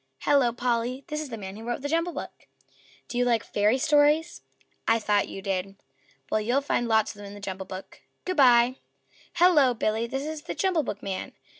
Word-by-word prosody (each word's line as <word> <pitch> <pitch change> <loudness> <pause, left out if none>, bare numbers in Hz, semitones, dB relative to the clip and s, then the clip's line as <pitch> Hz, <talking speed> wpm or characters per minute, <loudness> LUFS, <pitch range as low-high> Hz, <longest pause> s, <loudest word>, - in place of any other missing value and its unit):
"Hello, 275 -4 +3
Polly!" 245 +2 -1
"This 300 0 -2
is 305 - -6
the 230 - -6
man 195 -2 -7
who 220 - -9
wrote 240 +3 -4
the - - -1
JUMBLE 335 +3 0
BOOK. - - -8 0.6
Do 245 - -3
you - - +4
like 235 -2 +2
Fairy 210 +4 +1
Stories? 295 +3 +3 0.5
I 225 - +4
thought 210 -2 +1
you 195 - -8
did. 195 0 -2 0.6
Well, 215 - +2
you'll 245 +6 +1
find 245 -4 0
lots 220 -2 +2
of - - -16
them 205 -1 -9
in 200 - -10
the - - -10
JUMBLE 190 -1 -6
BOOK. 185 +1 -9 0.2
Good 370 -2 -2
by." 250 -1 +5 0.6
"Hello, 320 -8 +5
Billy." 220 +1 0
"This 270 +3 -3
is 310 0 -5
the - - -6
JUMBLE 375 -5 +1
BOOKman. 195 -3 -5
240 Hz, 200 wpm, -26 LUFS, 210-285 Hz, 0.6 s, by